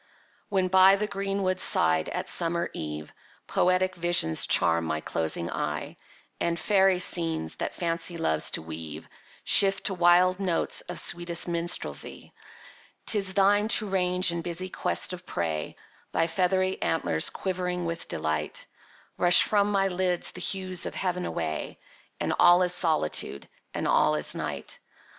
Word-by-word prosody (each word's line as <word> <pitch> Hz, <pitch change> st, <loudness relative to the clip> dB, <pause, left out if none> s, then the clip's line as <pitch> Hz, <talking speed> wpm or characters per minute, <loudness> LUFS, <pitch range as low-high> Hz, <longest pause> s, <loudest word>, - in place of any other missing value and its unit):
When 190 Hz, -3 st, +1 dB
by 190 Hz, +1 st, +6 dB
the 210 Hz, +2 st, -2 dB
green 195 Hz, -1 st, -3 dB
wood 185 Hz, 0 st, -1 dB
side, 80 Hz, -, +2 dB
at -, -, -4 dB
summer 170 Hz, 0 st, +1 dB
eve, 75 Hz, 0 st, -6 dB, 0.3 s
Poetic 185 Hz, +1 st, +1 dB
visions 170 Hz, -, +1 dB
charm 85 Hz, 0 st, +2 dB
my 80 Hz, -1 st, -2 dB
closing 80 Hz, +2 st, -2 dB
eye; -, -, -4 dB, 0.4 s
And 170 Hz, 0 st, -1 dB
fairy 195 Hz, -2 st, +3 dB
scenes, 165 Hz, -, 0 dB
that -, -, -4 dB
Fancy 170 Hz, 0 st, -1 dB
loves 80 Hz, -, 0 dB
to -, -, -10 dB
weave, 80 Hz, -1 st, -8 dB, 0.4 s
Shift 195 Hz, -1 st, +5 dB
to 195 Hz, -, -1 dB
wild 180 Hz, +1 st, +3 dB
notes 185 Hz, -4 st, -1 dB
of 175 Hz, -, -3 dB
sweetest 175 Hz, 0 st, +1 dB
Minstrelsy; 170 Hz, 0 st, -3 dB, 0.7 s
'Tis 195 Hz, -3 st, +1 dB
thine 205 Hz, +1 st, +3 dB
to 220 Hz, -1 st, +3 dB
range 180 Hz, -1 st, +1 dB
in 170 Hz, 0 st, -3 dB
busy 175 Hz, +2 st, -3 dB
quest 185 Hz, -, +2 dB
of 180 Hz, 0 st, -8 dB
prey, 80 Hz, -3 st, -3 dB, 0.4 s
Thy 165 Hz, -, +2 dB
feathery 185 Hz, +2 st, 0 dB
antlers 80 Hz, -, +1 dB
quivering 180 Hz, -2 st, -3 dB
with 170 Hz, 0 st, -4 dB
delight, 75 Hz, -1 st, -3 dB, 0.5 s
Brush 175 Hz, 0 st, +5 dB
from 205 Hz, -1 st, +1 dB
my 195 Hz, -1 st, +2 dB
lids 180 Hz, -1 st, -1 dB
the 180 Hz, -, -7 dB
hues 185 Hz, -2 st, -2 dB
of -, -, -7 dB
heav'n 180 Hz, -1 st, -2 dB
away, 80 Hz, -1 st, -4 dB, 0.4 s
And -, -, -1 dB
all 175 Hz, +1 st, +6 dB
is 180 Hz, 0 st, 0 dB
Solitude, 155 Hz, -, 0 dB, 0.2 s
and -, -, -3 dB
all 75 Hz, -, +3 dB
is 75 Hz, -, +2 dB
Night! -, -, -5 dB
175 Hz, 150 wpm, -26 LUFS, 165-185 Hz, 0.7 s, by